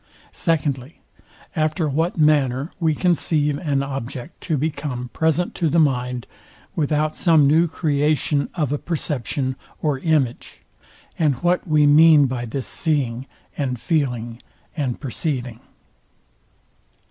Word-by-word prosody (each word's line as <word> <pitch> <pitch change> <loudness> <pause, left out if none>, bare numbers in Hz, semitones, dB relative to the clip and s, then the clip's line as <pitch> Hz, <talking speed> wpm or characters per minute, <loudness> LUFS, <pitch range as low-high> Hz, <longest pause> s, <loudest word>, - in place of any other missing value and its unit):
Secondly, 145 -4 -2 0.6
After 155 +1 0
what 160 +6 -1
manner 145 -2 +2
we 160 -3 +1
conceive 150 -4 +1
an 140 -4 0
object 135 +1 -6
to 160 - -1
become 140 -4 -3
present 160 +4 0
to 165 - 0
the 160 - +1
mind, 125 -5 +1 0.5
without 155 0 0
some 160 -4 +4
new 160 +5 +4
creation 150 -2 0
of 150 -6 -1
a 145 - -1
perception 140 -4 -2 0.2
or 150 -4 0
image; 145 -6 -1 0.6
and 150 -5 +3
what 175 +2 +1
we 155 -2 +4
mean 150 0 +7
by 125 -2 -3
this 125 +3 -4
seeing, 135 -5 -1 0.3
and 130 -4 -2
feeling, 125 -6 -1 0.3
and 135 -7 -2
perceiving. 125 -3 -3
145 Hz, 120 wpm, -22 LUFS, 130-160 Hz, 0.6 s, mean